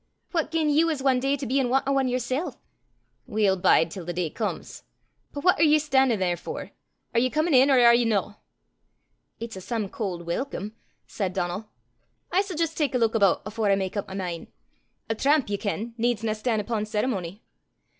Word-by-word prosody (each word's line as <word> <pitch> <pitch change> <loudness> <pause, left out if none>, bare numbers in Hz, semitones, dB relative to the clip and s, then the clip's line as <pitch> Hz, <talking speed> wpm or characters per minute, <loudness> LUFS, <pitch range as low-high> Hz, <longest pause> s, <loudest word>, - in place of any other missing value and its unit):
What 330 -4 0
gien 320 -2 +1
ye 305 +3 +4
was 310 -5 -1
ae 260 -2 +4
day 275 +2 0
to 275 - -5
be 265 +3 +1
in 255 -2 +1
want 270 +2 +1
o' 275 0 +2
ane 265 - +1
yersel'!" 255 +5 -2 0.7
"We'll 210 -5 +2
bide 170 -2 +3
till 185 - -7
the 175 +1 -4
day 175 -3 -2
comes. 220 - -4 0.5
But 285 - -6
what 360 -3 +4
are - - +5
ye 305 -1 +6
stan'in' 265 -5 +2
there 180 -2 0
for? - - -7 0.4
Are 230 - +3
ye 255 +2 +2
comin' 310 +3 0
in, 265 +2 +6
or 270 - +5
are 235 -1 +7
ye 240 +1 +4
no?" 205 -2 -1 1.0
"It's 230 -2 -6
a 190 - -7
some 220 -1 -3
cauld 180 -6 -4
welcome!" 210 +2 -4 0.3
said 190 -4 -3
Donal. 185 +4 -3 0.6
"I 365 - +3
s' 390 -3 -2
jist 325 0 -1
tak 285 -4 0
a - - +4
luik 230 -2 +2
aboot 200 -5 +3
afore 215 0 -1
I 195 - +5
mak 190 0 -3
up 205 - -3
my 190 - -8
min'. 180 -3 -4 0.6
A 225 - 0
tramp, 280 +5 +2
ye 200 - 0
ken, 215 +3 -3
needsna 225 -2 0
stan' 220 0 -1
upo' 210 0 -2
ceremony." 210 -3 -3
230 Hz, 205 wpm, -25 LUFS, 200-270 Hz, 1.0 s, are